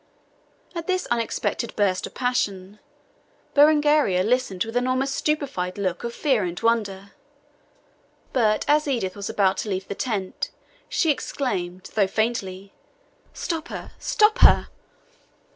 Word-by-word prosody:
At 335 -1 -5
this 370 -1 0
unexpected 235 0 -1
burst 190 -3 +1
of - - -16
passion, 205 -6 -1 0.7
Berengaria 295 -9 +4
listened 220 -5 +1
with 225 +1 -7
an 250 +1 +1
almost 265 +2 0
stupefied 275 -14 -1
look 185 -3 -2
of 235 - -3
fear 255 -4 +1
and 175 -1 -3
wonder. 200 -4 0 1.2
But 215 -4 +2
as 300 +1 +3
Edith 230 -9 -1
was 200 -1 -5
about 195 -2 +2
to 215 - -3
leave 190 -1 -3
the - - -3
tent, 200 -4 -3 0.4
she 325 - +2
exclaimed, 185 -11 -3
though 200 -3 +3
faintly, 195 -3 -2 0.6
"Stop 330 -2 -4
her, - - -7
stop 425 0 +3
her!" - - +6
225 Hz, 130 wpm, -24 LUFS, 190-275 Hz, 1.2 s, her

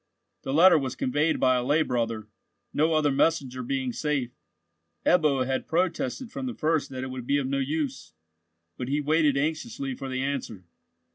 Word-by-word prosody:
The 135 - -4
letter 165 +3 +7
was 130 -2 -3
conveyed 145 +5 +1
by 130 -1 +4
a 125 - -1
lay 150 +5 +3
brother—no 115 +6 -3
other 150 -2 +3
messenger 135 -3 +1
being 130 0 -2
safe. 140 -5 -1 0.7
Ebbo 150 -7 +3
had 130 0 -2
protested 180 - -1
from 265 0 -4
the 250 - -4
first 155 -3 0
that 130 -1 -5
it 130 - -5
would 125 -2 -7
be 140 - +3
of 140 - -1
no 135 +1 -1
use, 135 - -3 0.6
but 125 - -4
he 145 +3 0
waited 150 -1 +2
anxiously 230 - -2
for 135 - -6
the 130 0 -2
answer. 130 -9 -4
140 Hz, 170 wpm, -27 LUFS, 130-160 Hz, 0.7 s, letter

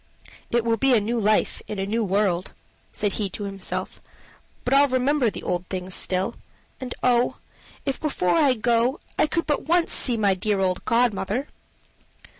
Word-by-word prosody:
"It 235 -1 +1
will 230 -1 +2
be 265 +3 +4
a - - +5
new 230 +3 -1
life 215 0 +1
in 210 - -5
a 195 - -1
new 225 +3 0
world," 190 -2 0 0.4
said 205 -2 -1
he 205 -3 -1
to 205 - -6
himself; 195 -1 -5 0.6
"but 250 - +1
I'll 280 +1 +6
remember 260 0 +2
the - - -8
old 180 0 -2
things 185 0 -4
still. 190 +5 0 0.5
And, 255 -2 -5
oh! 245 -1 +3 0.5
if 275 -2 -2
before 270 - 0
I 290 -6 +4
go 240 +4 +1 0.2
I - - +4
could 335 +2 -1
but 295 -1 -1
once 340 +1 +2
see 245 -3 +1
my 205 -3 +3
dear 200 +2 0
old 185 -1 0
godmother." 235 +2 +1
230 Hz, 175 wpm, -24 LUFS, 195-255 Hz, 0.6 s, I'll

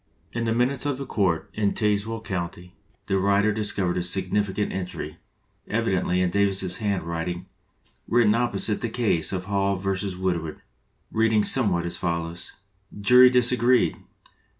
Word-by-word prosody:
In 120 0 -2
the 115 - 0
minutes 125 +4 0
of 140 -3 -1
the 140 - -5
court 95 -9 0
in 105 -2 0
Tazewell 105 +1 0
County 90 -2 -5 0.3
the 95 - 0
writer 100 +2 +3
dis 105 0 0
covered 90 -3 -1
a - - 0
significant 100 +3 0
entry, 95 -1 -5 0.5
evidently 90 +1 0
in 90 -1 +1
Davis's 95 -2 +1
handwriting, 90 -5 -3 0.6
written 115 -3 +4
opposite 115 -2 0
the 120 - -2
case 110 -8 0
of 95 -1 -3
Hall 100 0 0
v. 95 0 -2
Woodward, 85 -4 -3 0.5
reading 110 -1 +2
somewhat 100 -11 +1
as 85 - -2
follows: 85 0 -4 0.5
"Jury 125 +5 +7
disagreed. 125 0 +3
100 Hz, 140 wpm, -25 LUFS, 90-115 Hz, 0.6 s, Jury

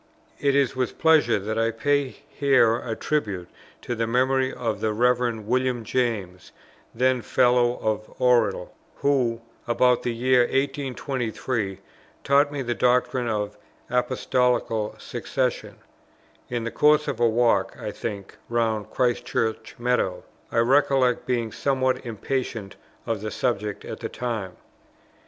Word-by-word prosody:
It 140 -1 +2
is 140 -2 +2
with 130 -1 -2
pleasure 155 -9 +4
that 110 +3 -3
I 115 0 +2
pay 140 +5 +1 0.2
here 130 -5 +3
a 115 -2 -4
tribute 105 -14 -2 0.4
to 120 - -3
the 115 -1 -1
memory 130 +2 +2
of 115 -3 -3
the 110 -1 0
Rev. 120 0 +1
William 125 0 0
James, 105 -7 -2 0.4
then 130 +1 +2
Fellow 120 +1 +3
of 110 0 -2
Oriel; 125 -1 +2 0.2
who, 125 -5 +1 0.3
about 125 +1 +3
the 120 - -1
year 125 +2 +2
1823, 130 -6 -2 0.4
taught 140 +1 +3
me 140 -2 -3
the 120 -1 -1
doctrine 125 0 +1
of 105 -2 -2 0.4
Apostolical 125 -3 0
Succession, - - -3 0.7
in 120 -2 -2
the 115 - -3
course 150 0 +4
of 135 -5 -3
a 120 -1 +4
walk, 115 -4 +2
I 105 - -4
think, 100 -2 -6
round 110 -3 0
Christ 125 0 0
Church 110 0 -2
meadow; 120 -6 0 0.3
I - - -2
recollect 130 0 +3
being 120 -3 0
somewhat 130 -1 0
impatient 115 -3 -4 0.3
of 115 -3 -2
the 110 - -3
subject 105 -4 -2
at - - -6
the - - -4
time. 110 -7 -4
120 Hz, 135 wpm, -24 LUFS, 110-130 Hz, 0.7 s, pleasure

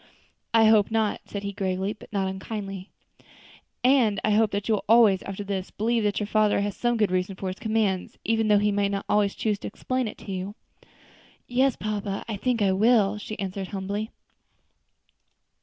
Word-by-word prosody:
"I 225 -1 +5
hope 215 -2 +5
not," 220 -2 0
said 200 -1 -6
he 200 0 -4
gravely, 190 +1 -2
but 215 - -16
not 195 -2 0
unkindly; 195 0 -6 0.9
"and 250 -6 +4
I 215 - +2
hope 215 +1 +4
that 200 0 -3
you 225 - +2
will 210 - -1
always, 220 -5 +6
after 195 +1 -6
this, 195 -2 -4
believe 230 +2 0
that 205 -1 +1
your 210 - -1
father 210 -1 +2
has 205 -1 -2
some 240 -1 0
good 210 -4 +2
reason 185 +1 -1
for 190 0 -4
his 185 - -7
commands, 215 -5 -1
even 225 0 +1
although 205 0 +4
he 210 - +3
may 200 0 +1
not 200 0 -3 0.3
choose 210 -2 -1
to - - -6
explain 255 -2 -2
it - - -7
to 200 - -9
you." 190 +2 -4 0.9
"Yes, 255 +1 +2
papa, 205 -2 -3
I 220 - -3
think 230 +1 0
I 195 - +3
will," 210 0 +3
she 215 +1 -7
answered, 195 -1 -4
humbly. 200 +2 -4
205 Hz, 190 wpm, -26 LUFS, 195-220 Hz, 0.9 s, always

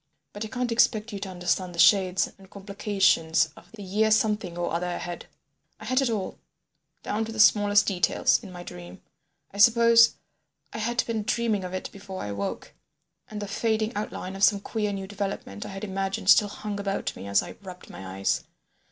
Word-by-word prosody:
But 205 - -5
I - - -4
can't 250 +1 -3
expect 225 -1 +2
you 200 - -4
to 195 0 -5
understand 180 0 -2
the - - -11
shades 185 +2 +4
and 190 -1 -16
complications 195 -5 +1
of - - -17
the 210 -2 -9
year—the 190 +2 -7
year 220 0 +4
something 210 -5 +1
or 175 -2 -2
other 175 +2 -1
ahead. 175 0 -5 0.5
I 215 - -10
had 255 +4 +2
it 265 - +1
all—down 215 +1 -6
to 225 - -7
the 220 - -7
smallest 205 -1 +5
details—in 190 +2 +1
my 175 -1 -9
dream. 90 - -11 0.5
I 200 - -9
suppose 230 +1 +6 0.6
I - - -5
had 240 +3 0
been 225 -2 -2
dreaming 215 -1 0
of 180 0 -5
it 185 - -5
before 195 -1 -8
I - - -5
awoke, 100 -1 -5 0.6
and 210 - -6
the 205 - -5
fading 220 +2 -1
outline 195 -2 -5
of 195 - -4
some 205 -1 +5
queer 210 -1 -2
new 195 -1 -4
development 195 - -5
I - - -8
had 195 +1 -8
imagined 195 -1 +1
still 210 - +5
hung 205 0 -5
about 200 -1 -3
me 95 - -8
as 100 - +2
I - - -10
rubbed 185 -2 -11
my 95 0 -8
eyes. 95 - 0
200 Hz, 195 wpm, -26 LUFS, 185-215 Hz, 0.6 s, suppose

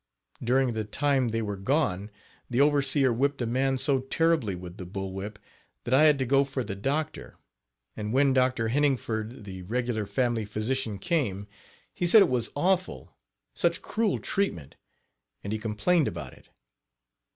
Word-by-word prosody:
During 125 +1 +2
the 110 -1 -2
time 135 +3 +1
they 115 0 -1
were 105 -1 -3
gone 100 - 0 0.4
the 125 - 0
overseer 140 -2 +3
whipped 140 +4 0
a 120 - -1
man 130 +3 +1
so 135 +1 +2
Page 130 - -9
20 - - -4
terribly 165 - +2
with 90 0 -9
the 90 - -7
"bull 95 0 -5
whip" 100 +2 -6 0.5
that 125 - -2
I 145 +4 +6
had 150 -2 +5
to 130 - -1
go 135 +2 +4
for 135 -1 -3
the 100 - -5
doctor, 140 +10 -3 0.6
and 105 -1 -4
when 135 +2 +3
Dr. 130 -3 +1
Heningford, 120 -4 -1
the 95 -2 -8
regular 115 +1 -2
family 120 -3 0
physician, 110 +1 -2
came, 100 - -1 0.5
he 175 - -1
said 210 +4 +8
it 185 - 0
was 125 -3 0
awful 180 - -1 0.4
such 170 -1 0
cruel 220 -3 0
treatment, 85 - -2 0.7
and 100 - -3
he 110 - -2
complained 125 +10 +1
about 75 -6 -6
it. - - -19
125 Hz, 170 wpm, -27 LUFS, 105-140 Hz, 0.7 s, said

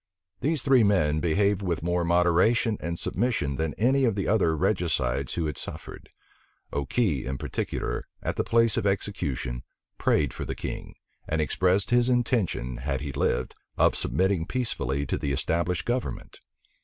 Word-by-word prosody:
These 150 -2 0
three 130 -4 +5
men 80 -7 +3
behaved 100 +4 +2
with 85 -5 -2
more 85 +1 +1
moderation 90 +7 +3
and 85 +1 -3
submission 95 - -1
than 80 -1 -2
any 135 +5 +2
of 115 -5 +2
the 100 - -2
other 85 -7 +2
regicides 70 -5 0
who 85 - -1
had 75 -3 -3
suffered. - - -8 0.6
Okey 70 - 0
in 65 +1 -3
particular, - - -3 0.2
at - - -2
the - - 0
place 115 -1 +3
of 100 - +1
execution, 70 -11 -2 0.4
prayed 75 -2 +2
for - - -5
the - - -4
king, - - -6 0.3
and 80 - -1
expressed 95 +7 +1
his 120 0 +4
intention, 115 - 0
had 65 +1 -2
he 70 -1 -4
lived, 65 -1 0 0.2
of - - +4
submitting 95 -3 0
peaceably 70 - -1
to 65 - -2
the 70 - -2
established 85 +5 -1
government. 120 +1 -3
85 Hz, 155 wpm, -27 LUFS, 75-110 Hz, 0.6 s, three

